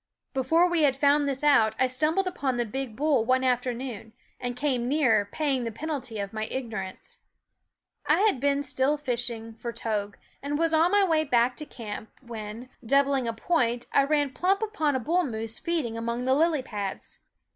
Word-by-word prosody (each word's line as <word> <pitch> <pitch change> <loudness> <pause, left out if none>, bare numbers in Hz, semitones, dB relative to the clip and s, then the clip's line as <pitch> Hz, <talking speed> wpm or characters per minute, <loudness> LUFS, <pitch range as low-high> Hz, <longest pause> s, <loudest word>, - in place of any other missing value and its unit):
Before 325 +6 +3
we 345 -2 +1
had 280 -3 +4
found 285 0 +3
this 270 +1 -3
out 230 -7 +4
I 260 - +3
stumbled 305 +9 +1
upon 280 -9 -2
the 240 - 0
big 255 0 -5
bull 290 -3 +2
one 255 +2 +2
afternoon, 245 -3 -2 0.3
and 245 0 -3
came 250 -3 0
near 245 -8 +2
paying 275 -5 0
the 230 - -3
penalty 260 -2 -4
of 200 0 -4
my 215 0 -2
ignorance. 220 -6 -6 0.9
I - - +4
had 415 - +3
been 280 +1 +1
still 270 +2 +1
fishing 235 -4 -3
for 235 +1 -6
togue, 210 -3 -3 0.3
and 285 +1 -2
was 330 0 +1
on 320 +2 +4
my 410 +1 +4
way 320 -4 +2
back 245 -3 +2
to 300 - -7
camp 220 -4 -7
when, 230 0 -8
doubling 275 +1 +2
a - - +1
THE - - -10
WOODS 225 - -18
point, 245 -8 +1
I 275 - +5
ran 290 -1 +1
plump 385 - +1
upon 315 -10 0
a - - +1
bull 340 +9 +1
moose 225 -4 -4
feed 335 -4 -1
ing 230 -1 -5
among 235 +2 -3
the 260 - +3
lily 310 -1 +2
pads. 205 -5 -6
260 Hz, 195 wpm, -27 LUFS, 230-295 Hz, 0.9 s, I